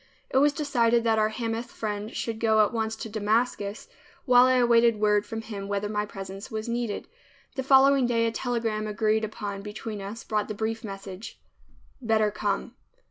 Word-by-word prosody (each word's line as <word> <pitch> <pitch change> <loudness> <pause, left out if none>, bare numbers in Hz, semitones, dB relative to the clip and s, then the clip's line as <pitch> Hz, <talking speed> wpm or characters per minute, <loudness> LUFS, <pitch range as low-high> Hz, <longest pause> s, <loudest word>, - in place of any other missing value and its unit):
It - - +1
was 290 +1 +5
decided 240 -6 +2
that 225 -1 +2
our 215 0 +3
Hamath 230 +1 -3
friend 210 -2 -4
should 225 -1 -4
go 220 -2 +4
at 210 - -5
once 220 -1 -1
to 225 - -6
Damascus, 215 -1 -1 0.4
while 250 -2 +7
I 255 - +4
awaited 235 -2 +4
word 210 -1 +2
from 225 0 -5
him 200 -3 -6
whether 200 0 -1
my 210 0 -1
presence 195 +1 -8
was 220 -1 -4
needed. 235 -2 -3 0.5
The 265 - -1
following 270 -1 +5
day 230 -1 +2
a 230 - +1
telegram 225 -3 -2
agreed 215 +1 +1
upon 205 -2 -4
between 210 0 -6
us 205 +4 -7
brought 210 -2 -1
the 215 - -5
brief 225 +2 -3
message, 195 0 -8 0.6
"Better 220 -3 +2
come." - - -2
220 Hz, 180 wpm, -27 LUFS, 210-235 Hz, 0.6 s, while